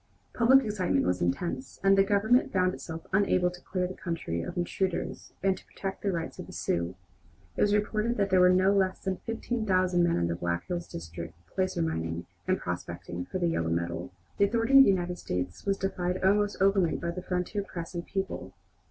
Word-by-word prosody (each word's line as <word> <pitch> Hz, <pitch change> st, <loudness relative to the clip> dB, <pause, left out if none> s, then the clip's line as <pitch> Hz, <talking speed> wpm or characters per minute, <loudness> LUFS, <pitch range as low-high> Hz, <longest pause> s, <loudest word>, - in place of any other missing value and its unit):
Public 255 Hz, +2 st, +5 dB
excitement 205 Hz, -4 st, +1 dB
was 90 Hz, 0 st, 0 dB
intense, 170 Hz, -, -2 dB
and 195 Hz, 0 st, +6 dB
the 195 Hz, -, +6 dB
Government 210 Hz, +5 st, +3 dB
found 185 Hz, -1 st, +2 dB
itself 165 Hz, -3 st, -7 dB
unable 185 Hz, -2 st, +3 dB
to 180 Hz, 0 st, -12 dB
clear 185 Hz, -1 st, -2 dB
the 180 Hz, -, -4 dB
country 165 Hz, -, -3 dB
of 85 Hz, -, -6 dB
intruders 180 Hz, +1 st, -2 dB
and 195 Hz, -1 st, +3 dB
to -, -, -14 dB
protect 195 Hz, -1 st, -5 dB
the 200 Hz, -, 0 dB
rights 165 Hz, -2 st, -4 dB
of -, -, -7 dB
the -, -, -11 dB
Sioux. 85 Hz, +2 st, -1 dB, 0.6 s
It -, -, -2 dB
was 205 Hz, 0 st, +4 dB
reported 215 Hz, +3 st, 0 dB
that 200 Hz, -2 st, +1 dB
there 185 Hz, -, +5 dB
were 180 Hz, 0 st, +7 dB
no 185 Hz, +2 st, +4 dB
less 190 Hz, -1 st, +1 dB
than 190 Hz, -1 st, -1 dB
fifteen 230 Hz, +2 st, -3 dB
thousand 185 Hz, -3 st, +3 dB
men 175 Hz, -, +2 dB
in 85 Hz, -, +1 dB
the 85 Hz, -, 0 dB
Black 85 Hz, 0 st, -2 dB
Hills 175 Hz, -1 st, -3 dB
district 85 Hz, 0 st, -7 dB
placer 185 Hz, -, -1 dB
mining 80 Hz, -, -2 dB, 0.2 s
and -, -, +2 dB
prospecting 90 Hz, +1 st, -5 dB
for -, -, -4 dB
the 175 Hz, -2 st, +1 dB
yellow 85 Hz, -, 0 dB
metal. 85 Hz, +1 st, -2 dB, 0.3 s
The 200 Hz, -, +6 dB
authority 230 Hz, +6 st, +4 dB
of 270 Hz, -, +10 dB
the -, -, +4 dB
United 180 Hz, -2 st, 0 dB
States 90 Hz, -, -4 dB
was 195 Hz, 0 st, +2 dB
defied 180 Hz, -1 st, -2 dB
almost 205 Hz, +2 st, +2 dB
openly 195 Hz, -3 st, +3 dB
by 170 Hz, -, -3 dB
the 180 Hz, +1 st, -5 dB
frontier 180 Hz, +3 st, -2 dB
press 175 Hz, -3 st, -7 dB
and 170 Hz, -1 st, -3 dB
people. 190 Hz, -, -4 dB
185 Hz, 205 wpm, -29 LUFS, 165-200 Hz, 0.6 s, of